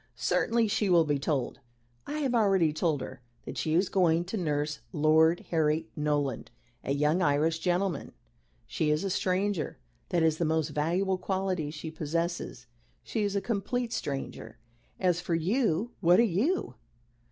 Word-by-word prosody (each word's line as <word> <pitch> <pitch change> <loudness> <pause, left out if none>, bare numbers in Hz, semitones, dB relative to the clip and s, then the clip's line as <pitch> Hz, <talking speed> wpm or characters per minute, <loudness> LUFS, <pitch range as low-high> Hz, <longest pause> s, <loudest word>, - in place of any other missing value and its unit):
"Certainly. 230 -1 +1
She 205 -1 +1
will 170 -2 +6
be 145 -2 0
told 140 -2 -2 0.5
I 300 +1 -3
have 265 -4 0
already 195 -9 +3
told 155 -3 0
her 130 - -8 0.2
that - - -6
she 155 0 0
is 180 +3 +3
going 175 -3 +2
to 185 - -5
nurse 150 -5 -1
Lord 160 +2 +4
Harry 160 0 +1
Norland, 145 -4 -1 0.3
a - - -3
young 150 +5 +2
Irish 160 0 +2
gentleman. 180 -2 -1 0.5
She 155 - -1
is 150 +3 +1
a 195 - -1
stranger. 185 -3 -1 0.3
That 175 -3 +2
is 160 -1 +2
the - - +1
most 160 -1 +1
valuable 175 +6 0
quality 185 -6 -1
she 155 +1 -7
possesses. 165 -4 -3 0.4
She 225 - -2
is 205 -1 -1
a 200 - +1
complete 230 +3 -2
stranger. 140 - -5 0.4
As 180 -2 +1
for 170 -1 -1
you, 210 +4 0
what 175 +1 +5
are - - +7
you? 235 - 0
170 Hz, 160 wpm, -29 LUFS, 155-195 Hz, 0.5 s, are